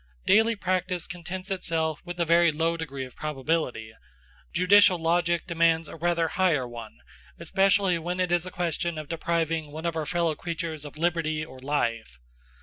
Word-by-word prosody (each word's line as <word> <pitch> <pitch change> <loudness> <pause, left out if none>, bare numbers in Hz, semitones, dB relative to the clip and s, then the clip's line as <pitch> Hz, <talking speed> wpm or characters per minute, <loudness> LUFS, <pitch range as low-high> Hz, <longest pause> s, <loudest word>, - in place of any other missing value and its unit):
Daily 225 +2 +4
practice 185 -2 -1
contents 185 +1 -7
itself 165 -4 -1
with 175 0 -7
a 170 - +2
very 170 0 +5
low 165 +2 0
degree 140 -5 -5
of 125 - -14
probability; 140 -6 -2 0.6
judicial 185 +1 +5
logic 170 +1 +1
demands 165 -2 +2
a - - -9
rather 170 0 +1
higher 160 -7 +1
one, 115 -2 -9 0.4
especially 195 +1 +2
when 175 +3 -3
it 180 -1 0
is 175 +1 +1
a - - -4
question 170 -1 -2
of 155 -1 -6
depriving 165 -1 -1
one 160 +3 -7
of 170 -1 -1
our 155 -2 -2
fellow 170 -2 +1
creatures 160 -1 -5
of 145 +1 -9
liberty 155 -2 0
or 130 -4 -13
life. 115 - -2
165 Hz, 165 wpm, -26 LUFS, 155-175 Hz, 0.6 s, very